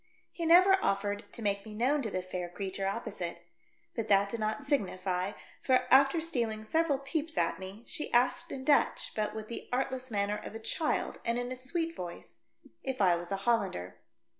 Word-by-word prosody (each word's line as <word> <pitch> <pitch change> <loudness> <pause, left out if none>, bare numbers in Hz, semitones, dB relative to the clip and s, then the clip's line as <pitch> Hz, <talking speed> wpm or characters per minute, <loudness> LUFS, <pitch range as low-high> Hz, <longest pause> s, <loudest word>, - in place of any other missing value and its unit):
He 335 -2 -3
never 370 +3 +7
offered 205 +1 -1
to 230 - -8
make 200 -1 0
me 215 -1 -9
known 265 +6 +2
to 225 - -2
the 185 -2 -2
fair 180 -1 -4
creature 195 +1 -3
opposite, 180 -4 -4 0.5
but 230 -2 -2
that 200 0 +4
did 230 - -4
not 215 +6 -1
signify, 190 -8 0 0.3
for, 255 -1 +3
after 275 +4 +6
stealing 235 -9 -1
several 315 +5 +2
peeps 305 +3 -3
at 165 0 +1
me, 190 +4 -8
she - - -4
asked 250 +1 +2
in 260 - -5
Dutch, 290 -2 +3
but 215 -1 -1
v/ith 220 -1 -6
the 235 - -7
artless 260 0 -1
manner 205 -1 0
of - - -8
a - - -5
child, 305 +7 -1
and 235 0 0
in 245 +1 -3
a - - -2
sweet 325 +6 -3
voice, 175 -9 -8 0.4
if 265 -1 -3
I 185 -4 +5
was 175 +1 -6
a - - +2
Hollander. 195 - 0
225 Hz, 190 wpm, -31 LUFS, 195-270 Hz, 0.5 s, never